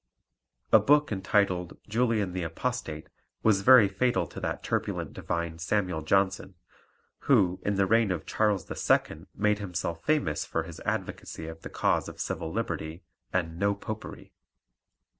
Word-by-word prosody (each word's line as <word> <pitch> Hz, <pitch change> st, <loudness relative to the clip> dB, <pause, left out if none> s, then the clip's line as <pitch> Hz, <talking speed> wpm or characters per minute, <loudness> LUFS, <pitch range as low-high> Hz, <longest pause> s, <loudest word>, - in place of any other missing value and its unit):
A -, -, +8 dB
book 150 Hz, -1 st, +3 dB
entitled 95 Hz, -3 st, 0 dB
Julian 110 Hz, -4 st, +1 dB
the 90 Hz, -, -2 dB
Apostate 80 Hz, -1 st, -4 dB, 0.4 s
was 105 Hz, -3 st, +4 dB
very 125 Hz, -1 st, +8 dB
fatal 120 Hz, +6 st, +1 dB
to -, -, -8 dB
that -, -, -3 dB
turbulent -, -, -2 dB
divine 85 Hz, -1 st, -3 dB
Samuel 90 Hz, -2 st, 0 dB
Johnson, 95 Hz, +3 st, +1 dB, 0.7 s
who 95 Hz, -9 st, +4 dB
in 100 Hz, -, 0 dB
the 95 Hz, 0 st, +3 dB
reign 110 Hz, +1 st, +3 dB
of 85 Hz, -4 st, -3 dB
Charles 105 Hz, -5 st, +1 dB
II. -, -, 0 dB
made 105 Hz, +1 st, +1 dB
himself 90 Hz, -4 st, -4 dB
famous 150 Hz, -, +1 dB
for 80 Hz, -, -2 dB
his 80 Hz, 0 st, -10 dB
advocacy 80 Hz, -, -4 dB
of 80 Hz, 0 st, -8 dB
the -, -, -7 dB
cause -, -, 0 dB
of -, -, -12 dB
civil 80 Hz, -, -3 dB
liberty 80 Hz, -6 st, -4 dB, 0.3 s
and 85 Hz, -2 st, -2 dB
"no 100 Hz, +1 st, +2 dB
popery." 110 Hz, +2 st, -8 dB
95 Hz, 145 wpm, -28 LUFS, 85-110 Hz, 0.7 s, A